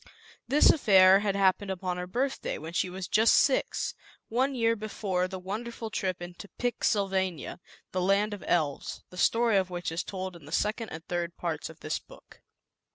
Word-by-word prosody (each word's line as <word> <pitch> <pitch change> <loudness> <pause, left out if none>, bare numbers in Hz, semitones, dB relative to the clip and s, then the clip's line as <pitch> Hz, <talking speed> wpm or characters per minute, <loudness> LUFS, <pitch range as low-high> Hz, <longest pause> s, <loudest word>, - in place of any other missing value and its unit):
This 290 +3 +6
affair 195 - +6
had 200 -1 -1
happened 195 0 +2
upon 185 -1 -3
her 180 0 -4
birthday, 260 +8 -2
when 160 +2 -8
she 180 - 0
was 185 0 -6
just 220 +1 +5
six, 270 - +2 0.4
one 260 +4 +1
year 230 -1 +2
before 200 -4 -2
the 190 0 -6
wonderful 220 +4 -5
trip 185 -4 -2
into 175 +3 -9
Pix 245 -2 0
Sylvania, 190 -6 -1 0.3
the 185 - -1
land 200 +3 +2
of 205 - -7
Elves, 150 -5 -1
the - - -12
story 230 +2 +3
of 190 -1 +1
which 175 -2 -4
is 165 - -2
told 185 -2 -5
in 170 - -13
the - - -12
second 215 +2 -1
and 160 0 -8
third 175 -1 -3
parts 165 -3 -3
of - - -14
this - - -2
book. - - -18
190 Hz, 185 wpm, -29 LUFS, 180-220 Hz, 0.4 s, This